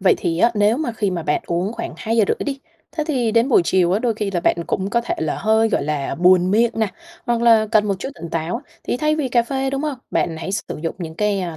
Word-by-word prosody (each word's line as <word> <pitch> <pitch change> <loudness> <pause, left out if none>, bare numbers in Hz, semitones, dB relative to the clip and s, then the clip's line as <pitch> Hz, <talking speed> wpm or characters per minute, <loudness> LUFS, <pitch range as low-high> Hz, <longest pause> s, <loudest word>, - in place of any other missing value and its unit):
Vậy 190 - +4
thì 165 0 -1
á, 235 - +4
nếu 210 +2 +3
mà 285 -5 -2
khi 205 -3 -1
mà 170 -3 -3
bạn 150 -1 0
uống 180 +5 -1
khoảng 230 - -6
2:30 225 -2 +1
đi, 275 -1 -3 0.3
thế 310 -2 -2
thì 250 -7 0
đến 230 +4 +3
buổi 240 - +5
chiều 180 0 +2
á, 200 - +2
đôi 235 -1 0
khi 210 -2 -2
là 175 - -1
bạn 170 - +2
cũng 190 +1 -2
có 235 - +2
thể 235 - -3
là 160 -1 -1
hơi, 220 +2 +3
gọi - - 0
là, 145 -2 -2
buồn 180 +2 +4
miệng 230 +3 +3
nè, 220 -1 +1 0.4
hoặc 235 -1 0
là 225 -2 +5
cần 210 -1 +4
một 200 - +1
chút 270 - -4
tỉnh 170 - -8
táo 165 - -2 0.2
thì - - -1
thay 305 +3 +1
vì 295 -4 -1
cà 240 -1 +3
phê, 270 +2 -2
đúng 275 +2 -2
hông, 295 -4 -3
bạn 165 -2 0
hãy 185 +4 -5
sử 200 - -1 0.2
dụng 165 - -2
những 160 -2 -6
cái, 205 +1 0
a, 170 -3 -4
215 Hz, 275 wpm, -20 LUFS, 180-235 Hz, 0.4 s, buổi